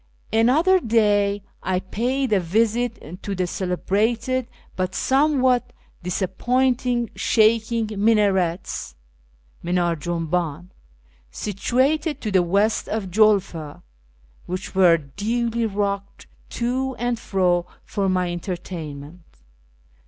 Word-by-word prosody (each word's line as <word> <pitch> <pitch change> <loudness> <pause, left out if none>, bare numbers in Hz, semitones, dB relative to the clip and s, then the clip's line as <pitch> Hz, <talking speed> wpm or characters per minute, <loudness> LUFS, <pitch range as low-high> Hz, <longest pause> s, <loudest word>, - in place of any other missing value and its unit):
Another 300 +12 +4
day 205 - +2 0.2
I 185 -1 0
paid 245 +6 -1
a 200 - +4
visit 215 -1 -1
to 200 - -4
the 185 0 0
celebrated, 220 +8 -1 0.3
but 185 0 -2
some 280 +1 +2
what 250 -1 +2 0.3
disappointing, 240 +6 0
"shaking 225 0 +2 0.2
minarets" 195 -6 +1 0.7
(mindr4 175 0 +1
i - - +1
junhdn) 170 +1 -2 0.6
situated 265 - 0
to 215 - -3
the 190 -2 +4
west 200 +5 +1
of 210 -4 -3
Julfa, 190 -7 +1 0.7
wliicli 185 +1 -4
were 180 -3 +5
duly 225 - -2
rocked 200 -1 -3 0.2
to 260 +2 -2
and 240 -1 -1
fro 180 -4 +1 0.2
for 195 -1 -1
my 180 -1 0
entertainment. 175 -3 -6
205 Hz, 100 wpm, -23 LUFS, 180-235 Hz, 0.7 s, were